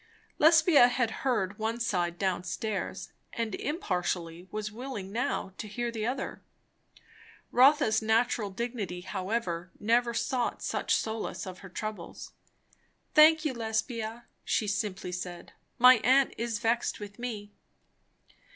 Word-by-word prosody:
Lesbia 320 -4 +7
had 245 -2 0
heard 210 -6 0
one 225 +2 -1
side 175 -7 -1
down 185 -1 -1
stairs, 200 +2 -4 0.2
and 230 -3 -2
impartially 180 - -3
was 210 0 -4
willing 225 -4 -6
now 220 -4 -2
to 215 - -5
hear 240 +3 -3
the 225 -1 -3
other. 260 +2 -4 1.1
Rotha's 265 -3 +5
natural 220 -1 +1
dignity 205 -4 -4
however 185 -2 -3
never 235 +2 +2
sought 250 0 -1
such - - 0
solace 220 -1 -3
of 185 -1 -8
her 190 - -11
troubles. 210 -2 -6 0.8
"Thank 315 +1 +7
you, 295 - 0
Lesbia," 225 0 -3 0.2
she 215 - 0
simply 195 -3 -2
said. 180 -1 -6 0.2
"My 250 +1 +8
aunt 265 +4 +3
is 230 -1 -2
vexed 230 +1 0
with 205 0 -9
me." 215 -4 -5
220 Hz, 125 wpm, -29 LUFS, 195-245 Hz, 1.1 s, My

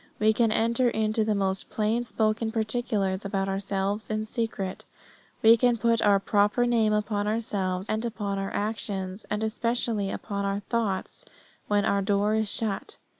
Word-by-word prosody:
We 215 +1 +4
can 225 0 +2
enter 235 +3 +2
into 220 -1 +1
the 215 -1 +1
most 195 -1 -1
plain 225 +3 0
spoken 220 0 0
particulars 215 -4 0
about 195 -1 -1
ourselves 195 +1 -2
in 215 0 -1
secret. 215 -5 -3 0.6
We 225 +1 +9
can 240 0 +3
put 230 0 +2
our 200 -1 +4
proper 205 +4 +2
name 230 -3 +2
upon 210 -1 0
ourselves, 195 -4 -1
and 215 +1 -1
upon 205 -4 -3
our 195 0 -2
actions, 200 -2 -3
and 210 +1 -1
especially 225 -2 0
upon 200 0 -4
our 200 +1 -1
thoughts 220 - -2 0.4
when 205 0 +2
our 200 -2 +2
door 205 +1 +1
is 220 -1 0
shut. 215 -4 -2
215 Hz, 160 wpm, -27 LUFS, 200-225 Hz, 0.6 s, We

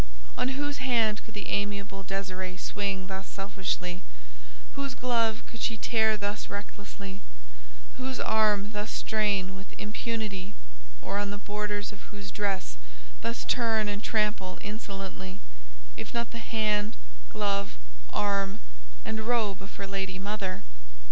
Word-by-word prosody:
On 260 +2 +2
whose 290 0 0
hand 230 -5 +4
could - - -10
the 205 - -2
amiable 200 -1 0
Désirée 190 -1 -2
swing 195 -2 0
thus 190 0 -3
selfishly, 190 -2 -1 0.7
whose 275 -1 -1
glove 230 -3 +3
could 230 - -8
she 225 - +2
tear 220 -1 +5
thus 205 0 -1
recklessly, 200 -1 -5 0.8
whose 260 0 -1
arm 210 -2 +4
thus 210 0 -1
strain 200 -3 +2
with 195 +1 -9
impunity, 210 -2 -1 0.5
or 200 - +1
on 205 0 +1
the 205 - -2
borders 205 0 -1
of 205 - -10
whose 200 -1 -5
dress 195 - 0 0.4
thus 115 - -1
turn 225 -3 +4
and 205 0 -1
trample 210 -4 +2
insolently, 195 -3 -4 0.6
if - - -5
not 235 0 +1
the 235 - -3
hand, 215 -2 +2 0.3
glove, 200 -1 +1 0.3
arm, 200 -1 +2 0.5
and 220 0 -1
robe 215 -6 +3
of 195 - -8
her 200 - -2
lady 195 -1 -1
mother? 195 -1 -1
205 Hz, 135 wpm, -31 LUFS, 195-220 Hz, 0.8 s, tear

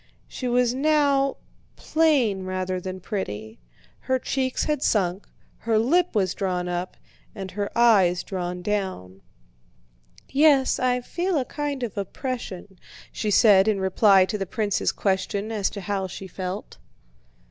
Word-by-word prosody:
She 255 - -5
was 245 0 +2
now 280 -1 +2 0.4
plain 275 -12 +1
rather 185 0 -3
than 185 0 -6
pretty. 110 - -5 0.4
Her 260 0 0
cheeks 260 0 -1
had 300 -3 -1
sunk, 190 -5 0 0.3
her 225 -1 +1
lip 330 +8 +2
was 190 -4 +1
drawn 180 -2 -2
up, 175 +1 -4 0.4
and 190 -1 -6
her 205 +1 -3
eyes 195 -7 +4
drawn 180 -2 -4
down. 185 - -3 1.1
"Yes, 280 -1 +3
I 250 0 +1
feel 350 +7 -2
a 265 - 0
kind 285 -1 -4
of 220 -4 -4
oppression," 200 -3 -6 0.3
she 215 - -3
said 205 -1 +5
in 210 -2 +2
reply 190 0 +4
to 210 +2 -4
the 195 - -3
prince's 205 0 0
question 200 +2 -1
as 210 -3 0
to 200 - -7
how 195 0 -2
she 190 +1 -8
felt. 185 +2 -6
205 Hz, 140 wpm, -24 LUFS, 185-255 Hz, 1.1 s, said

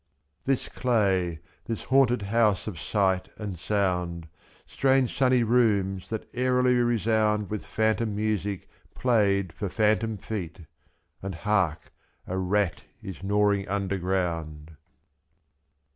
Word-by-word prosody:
This 135 -1 0
clay, 95 -9 0 0.2
this 115 - -4
haunted 125 -4 +3
house 105 -1 +2
of 95 -7 -6
sight 95 -2 0
and 100 -5 -6
sound. 90 -3 -1 0.4
Strange 135 -2 +1
sunny 130 -2 +3
rooms 105 -5 +1
that 110 -1 -4
airily 125 0 +2
resound 110 -3 +2
/6~t.With 105 +2 -5
phantom 110 -1 0
music 105 -2 -2 0.3
played 100 -7 +2
for 100 - -4
phantom 110 +2 +1
feet 90 -4 -6 0.3
— - - -44
And 95 -1 -5
hark! 95 -4 0 0.3
a 95 - -4
rat 95 0 0 0.2
is 95 -2 -7
gnawing 100 0 +1
underground. 90 -6 -2
105 Hz, 115 wpm, -27 LUFS, 95-115 Hz, 0.4 s, haunted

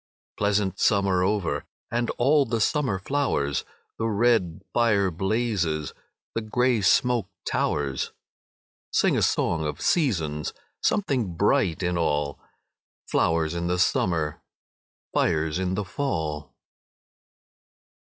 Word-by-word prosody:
Pleasant 100 -2 0
summer 100 -3 +3
over 90 -7 0 0.3
And 120 +1 0
all 140 +4 +4
the 115 -2 -1
summer 130 -4 +1
flowers, 95 - 0 0.4
The 115 - 0
red 105 -6 +1
fire 105 -5 +3
blazes, 95 -5 -1 0.4
The 115 - -1
grey 125 +1 +1
smoke 120 +1 +3 0.2
towers. 70 -2 -1 0.8
Sing - - +3
a - - +1
song 80 -2 +1
of 75 -2 -3
seasons! 80 - 0 0.3
Something 125 - 0
bright 95 -2 +2
in 90 -1 0
all! 75 -3 0 0.7
Flowers 80 -1 +1
in 85 0 -2
the 90 +1 0
summer, 85 -4 +1 0.7
Fires 80 +1 +1
in 95 0 -1
the 105 +1 -2
fall! 80 - -3
95 Hz, 110 wpm, -25 LUFS, 80-115 Hz, 0.8 s, all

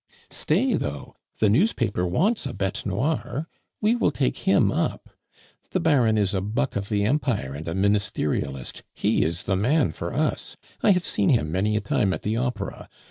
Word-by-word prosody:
"Stay 225 +11 +1
though! 75 - -3 0.2
the 110 - +3
newspaper 105 - +2
wants 185 - +1
a 130 - -5
bete 95 +1 -2
noire; 135 - -1 0.3
we 220 +2 +3
will 240 - +2
take - - 0
him - - +4
up. - - -2 0.6
The 185 - 0
Baron 130 -10 +3
is 100 -1 +1
a 95 - 0
buck 115 +8 -1
of 100 0 -3
the 100 -1 +1
Empire 115 - 0
and 75 +4 -7
a 80 - -2
Ministerialist; 95 -9 -1
he - - +2
is 85 +2 -2
the 95 - 0
man 120 - +2
for - - -5
us; - - -1 0.2
I - - +4
have 180 -1 -1
seen 100 - +1
him 75 -11 +2
many 100 +5 +1
a 105 - +1
time 100 -2 +1
at - - -9
the 105 +2 0
Opera. 125 +1 -3
105 Hz, 185 wpm, -25 LUFS, 95-145 Hz, 0.6 s, him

